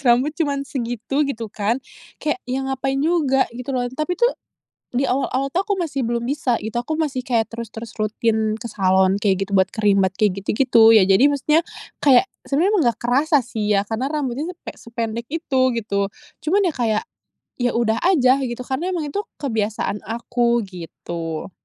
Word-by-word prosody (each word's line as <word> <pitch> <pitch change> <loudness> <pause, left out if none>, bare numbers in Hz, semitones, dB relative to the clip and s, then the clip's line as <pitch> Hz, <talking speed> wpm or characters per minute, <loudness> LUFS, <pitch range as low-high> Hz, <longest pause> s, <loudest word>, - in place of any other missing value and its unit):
rambut 250 +5 +4
cuman 280 -3 0
segitu, 245 0 -3
gitu 225 -5 -5
kan. 215 +3 0 0.4
Kayak 300 -4 -2
ya 265 +1 -1
ngapain 270 0 -1
juga 285 -3 +2
gitu 250 +2 -8
loh. 245 - 0
Tapi 305 +6 -2
tuh 480 +5 +3 0.6
di 250 +2 -1
awal-awal 275 +1 0
tuh 365 - +1
aku 410 - +2
masih 290 -5 -3
belum 235 0 -1
bisa 260 -1 0
gitu. 220 +2 -4
Aku 280 +6 -3
masih 300 -5 -1
kayak 230 -3 0
terus-terus 230 0 -7
rutin 220 0 0
ke 235 +1 -7
salon 190 0 +3
kayak 195 -2 +1
gitu - - -11
buat 190 0 +4
creambath 200 -4 +2
kek 205 0 +2
gitu-gitu. 225 +3 +4
Ya 215 - +7
jadi 195 +9 +6
maksudnya, 290 +2 +2 0.4
kayak 270 0 +6 0.2
sebenarnya 325 +9 +2
emang 405 -7 +3
nggak 230 - 0
kerasa 275 +3 +3
sih 215 -3 -1
ya 200 - +2
karena 225 +5 -2
rambutnya 290 0 -2
tuh - - -51
kek - - -8
sepe - - -18 0.2
sependek 230 +1 -4
itu, 285 -4 -1
gitu. 200 -3 -1 0.3
Cuman 390 +7 +2
ya 350 -4 +1
kayak, 225 -5 0 0.6
ya 245 -1 +1
udah 230 -1 +1
aja 270 -8 +5
gitu 240 0 -4
karena 270 +8 -2
emang 315 -4 -2
itu 405 - -2 0.2
kebiasaan 220 -5 -1
aku, 235 +1 0
gitu. 170 -2 -6
245 Hz, 180 wpm, -21 LUFS, 220-280 Hz, 0.6 s, Ya